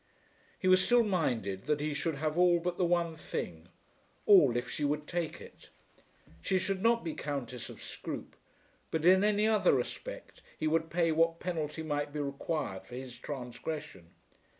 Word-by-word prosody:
He 185 - -2
was 185 0 +6
still 240 -1 +5
minded 120 - -1
that 150 -1 +2
she 150 0 -1
should 160 +2 -1
have 155 +2 -1
all 175 0 +5
but 175 +1 -3
the 180 - +3
one 170 -1 +1
thing, 85 - -5 0.6
all 145 - +7
if 120 - -2
she 150 - -4
would 150 +1 0
take 170 0 -3
it. - - -14 0.7
She 190 - +1
should 190 +1 -1
not 230 +2 +3
be 165 -2 -3
Countess 125 -5 -4
of - - -11
Scroope; - - -7 0.5
but 160 0 -1
in 190 +2 +7
any 210 0 +3
other 220 -2 +4
respect - - -4 0.2
he - - -3
would 160 +1 +1
pay 165 0 +2
what 165 +1 +2
penalty 160 -3 -3
might 145 -1 -2
be 150 - -4
required 140 - -3
for 125 - -9
his 125 -2 -8
transgression. 125 - -6
160 Hz, 175 wpm, -31 LUFS, 140-180 Hz, 0.7 s, all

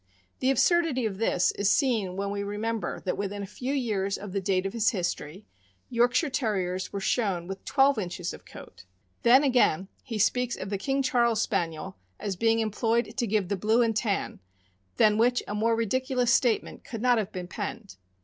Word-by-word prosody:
The 260 - +1
absurdity 280 -1 +2
of 200 -3 -3
this 185 -5 +2
is 200 0 0
seen 215 -7 +1
when 200 +1 -2
we 200 0 -3
remember 210 +2 -3
that 185 - -3
within 200 0 -3
a - - -4
few 250 +6 -5
years 210 -8 -1
of 205 -1 -8
the 195 +1 -2
date 190 -1 0
of 195 - -3
his 225 -2 +2
history, 180 -3 -4 0.5
York 245 0 +2
shire 330 - +3
Terriers 190 -7 -1
were 200 - -3
shown 195 -4 0
with 195 +2 -7
twelve 275 -3 +3
inches 180 -2 -4
of - - -12
coat. - - -13 0.4
Then, 255 +4 +6
again, 240 - +2
he 230 -5 -5
speaks 245 +3 +1
of 195 - -6
the 200 - -2
King 270 +5 0
Charles 235 -4 +2
Spaniel 165 - -3 0.2
as 200 -2 -3
being 225 +4 +2
employed 225 +2 0
to 240 -3 -1
give 205 -2 0
the 200 - -1
blue 220 +5 +2
and 225 -1 0
tan, 210 -2 -1 0.6
than 215 0 +4
which 245 +2 +3
a - - -4
more 225 +2 +1
ridiculous 250 +2 +1
statement 240 -4 +1
could 230 -1 -7
not 245 -2 +4
have 210 -1 -3
been 180 -2 -6
penned. 205 +2 -6
215 Hz, 195 wpm, -27 LUFS, 195-245 Hz, 0.6 s, Then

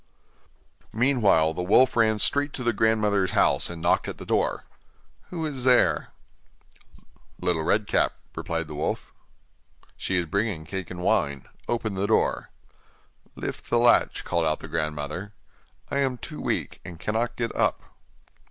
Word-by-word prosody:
Meanwhile 110 - +3
the 90 - -4
wolf 105 +8 +4
ran 110 -2 +3
straight 145 +7 +1
to 125 - -5
the 120 -1 +1
grandmother's 105 -3 +2
house - - +3
and 85 -1 -7
knocked 85 - +2
at - - -5
the - - -9
door. - - 0 0.7
'Who 165 -3 -3
is 135 -5 -4
there?' 125 -1 +3 1.3
'Little 90 -3 0
Red 105 +6 +1
Cap,' - - +1 0.2
replied 85 0 -3
the 75 - -9
wolf. 75 - -3 0.8
'She 95 - -1
is 90 - +1
bringing 100 -2 -1
cake 95 +1 -5
and 90 -1 -7
wine; 70 -6 +1 0.2
open 115 -3 -1
the 95 +1 -1
door.' 110 - +1 0.9
'Lift - - -6
the 120 - +3
latch,' 120 +1 +4
called 85 -1 0
out 75 - 0
the - - -9
grandmother, 75 +4 -3 0.6
'I - - 0
am 135 -2 0
too - - -8
weak, - - -2
and 85 -2 -9
cannot 115 +4 -1
get 115 -1 -3
up. - - +1
100 Hz, 150 wpm, -26 LUFS, 85-120 Hz, 1.3 s, wolf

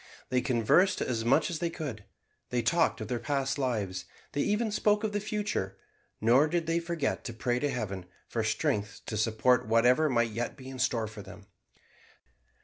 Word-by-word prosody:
They 125 0 +2
conversed 130 - +3
as 115 -3 -1
much 120 +8 +3
as 165 - -3
they 170 - 0
could, 135 -11 -6 0.4
they 120 -1 0
talked 165 0 +2
of 110 - -4
their 120 +1 -2
past 135 +2 -1
lives, 100 -8 -1 0.3
they 145 - -1
even 210 +4 +1
spoke 210 0 +2
of 215 - 0
the 205 - -1
future; 210 - -2 0.4
nor 125 +7 +5
did 170 +1 0
they 165 +1 +1
forget 170 -4 -2
to 120 - -4
pray 120 +2 0
to 145 - 0
Heaven 100 -8 -3 0.2
for - - -2
strength 105 -1 -1
to 110 - -4
support 110 +2 +2
whatever 125 +7 +4
might 120 -3 +2
yet 120 +5 -3
be 130 -1 -9
in 130 -1 -8
store 125 -3 +1
for 110 -1 -8
them. 100 +1 -12
125 Hz, 185 wpm, -30 LUFS, 110-160 Hz, 0.4 s, nor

